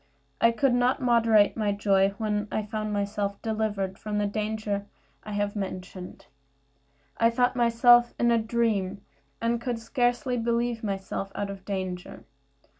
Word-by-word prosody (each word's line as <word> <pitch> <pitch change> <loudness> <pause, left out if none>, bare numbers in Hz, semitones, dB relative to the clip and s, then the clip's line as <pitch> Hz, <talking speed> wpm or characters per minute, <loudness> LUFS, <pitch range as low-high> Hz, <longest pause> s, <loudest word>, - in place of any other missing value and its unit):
I 230 - +6
could 245 +2 +2
not 245 +2 +2
moderate 230 -5 +4
my 210 -2 0
joy 195 -1 +2
when 210 -2 -1
I 215 - -1
found 215 0 -3
myself 200 0 -2
delivered 210 -4 -2
from 210 -1 -3
the 210 - +1
danger 210 -1 -2 0.4
I 210 - -7
have 205 0 -1
mentioned. 185 -2 -6 0.9
I 230 - +4
thought 245 +2 +1
myself 240 0 +5
in 235 0 +3
a 230 - +4
dream, 220 -4 0 0.4
and 230 0 0
could 245 -2 -2
scarcely 245 +2 0
believe 235 0 -1
myself 195 -1 -3
out 200 -1 -3
of 195 -1 -10
danger. 185 -3 -5
215 Hz, 145 wpm, -27 LUFS, 200-235 Hz, 0.9 s, I